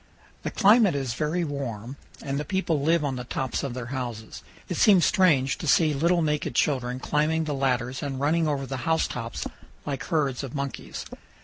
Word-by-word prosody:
The - - -3
climate 210 -4 +5
is 135 -4 -2
very 155 +7 -1
warm 130 -5 -4 0.3
and 140 0 -2
the - - -2
people 165 -2 0
live 160 +1 +2
on 135 -2 -2
the 125 - -4
tops 130 +1 -2
of 135 -3 -4
their 125 -2 -4
houses. 120 -4 -5 0.3
It - - -3
seems 195 -5 +6
strange 150 -9 +3
to 160 - -4
see 155 +1 +4
little 170 +4 +2
naked 150 -5 -1
children 125 -3 +1
climbing 155 +4 +1
the 155 -2 -2
ladders 130 -2 -1
and 135 -2 -3
running 160 +3 +2
over 140 -2 -1
the 135 0 -4
house 160 +6 +1
tops 115 0 -5 0.4
like 140 -2 -3
herds 140 -5 0
of 135 +1 -6
monkeys. 140 -1 -5
140 Hz, 190 wpm, -26 LUFS, 130-160 Hz, 0.4 s, seems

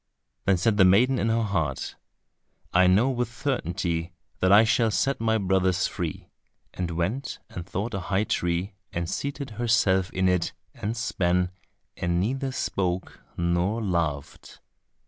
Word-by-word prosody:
Then 95 -1 +4
said 105 +4 +2
the 95 - +7
maiden 120 +8 +5
in 115 - +1
her 115 0 +2
heart, 80 -10 -2 0.8
"I 90 +1 +5
know 105 +9 +4
with 120 -2 -2
certainty 90 - -2 0.3
that 95 - +3
I 105 +2 +8
shall 115 0 +3
set 130 +6 0
my 110 -1 +2
brothers 95 -2 +2
free," - - -4 0.4
and 90 -2 -3
went 90 +11 -2
and 90 +1 -7
sought 105 +5 -3
a 95 - -1
high 95 +3 0
tree 90 0 -1 0.2
and 85 0 -2
seated 140 - -4
herself 100 -6 +3
in 95 0 0
it 90 -2 +1 0.2
and 110 +3 -4
span, 90 -6 +1 0.4
and 85 0 0
neither 135 +7 -1
spoke 95 -6 -2 0.2
nor 85 +5 +1
laughed. 85 -9 -3
95 Hz, 145 wpm, -26 LUFS, 90-115 Hz, 0.8 s, I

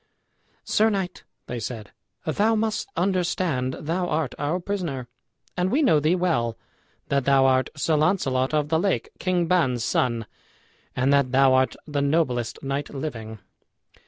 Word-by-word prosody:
"Sir 220 +1 +3
knight," 190 -4 -3 0.2
they 125 - -5
said, 110 -2 -6 0.3
"thou 210 +8 +2
must 220 - -1
understand 175 -8 0
thou 175 +4 -2
art 155 -5 -1
our 150 +5 0
prisoner; 175 -10 -3 0.5
and 180 +1 0
we 295 +6 +3
know 205 - +5
thee 155 +4 +2
well, 155 -11 0 0.5
that 140 -2 +1
thou 135 -1 +5
art 130 -1 +3
Sir 155 +2 +1
Launcelot 145 -5 +1
of 150 -1 0
the 160 0 +2
Lake, 195 +2 0
King 180 -2 +1
Ban's 130 -9 +1
son, 120 -3 0 0.7
and 130 +3 +2
that 140 -3 +3
thou 135 0 +5
art 130 0 +2
the 145 -2 -2
noblest 140 -6 0
knight 140 +1 -2
living. 115 -7 -6
145 Hz, 150 wpm, -24 LUFS, 130-180 Hz, 0.7 s, know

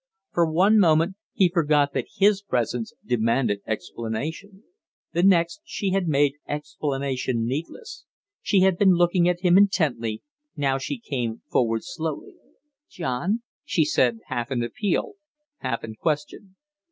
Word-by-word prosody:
For 170 -2 +2
one 195 +7 +4
moment 165 0 +3 0.2
he 190 - +3
forgot 150 -4 +2
that - - -2
his 200 0 +4
presence 120 - -2
demanded 115 -3 +1
explanation; 150 - -5 0.5
the 170 - +1
next 180 - +3
she 200 - -3
had 190 -2 0
made 145 -1 +2
explanation 135 -5 -2
needless. 155 - -5 0.4
She 195 -3 +2
had 190 -2 +3
been 195 -2 +6
looking 175 0 +3
at 175 0 -1
him 180 0 +5
intently; 140 - +1 0.3
now 135 -2 0
she 270 - -4
came 125 - -4
forward 115 -2 +1
slowly. 160 -2 -5 0.6
"John?" 175 - -2 0.2
she 160 - +1
said, 120 -6 +1
half 120 0 -3
in 125 -3 -1
appeal, 205 - -2 0.4
half 115 -2 -3
in 110 - -6
question. 155 - -3
155 Hz, 135 wpm, -24 LUFS, 125-185 Hz, 0.6 s, been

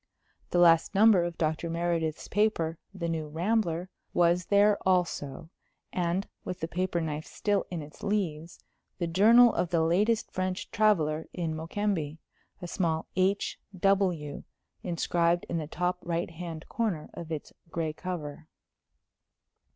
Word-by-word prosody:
The - - 0
last 170 +1 +5
number 205 -3 +6
of 175 -1 -4
Dr. 160 +1 -1
Meredith's 165 -1 -1
paper, 180 -6 +1
The 185 -4 -4
New 160 -2 -2
Rambler, 175 +1 0 0.2
was 175 0 +3
there 205 +1 +5
also; 170 -4 0 0.4
and, 180 +1 0 0.2
with 185 0 -5
the 160 - -2
paper 180 0 -1
knife 155 -1 -3
still 205 -1 -1
in 170 -4 -4
its 150 +2 -14
leaves, 175 -6 -2 0.4
the 175 - -1
journal 225 +8 +6
of 175 0 0
the 170 -2 +2
latest 210 +7 +2
French 185 0 -3
traveller 160 -8 +2
in 165 -3 -2
Mokembe, 165 -2 -2 0.5
a - - -4
small 165 -3 -1
"H.W." 185 -4 0 0.4
inscribed 170 0 +1
in 165 - -1
the 155 - -4
top 180 +3 -1
right 170 0 -2
hand 165 -1 -7
corner 205 -10 -2
of 165 -1 -8
its 155 -2 -5 0.2
gray 165 -2 -2
cover. 160 -3 -6
175 Hz, 135 wpm, -29 LUFS, 160-190 Hz, 0.5 s, number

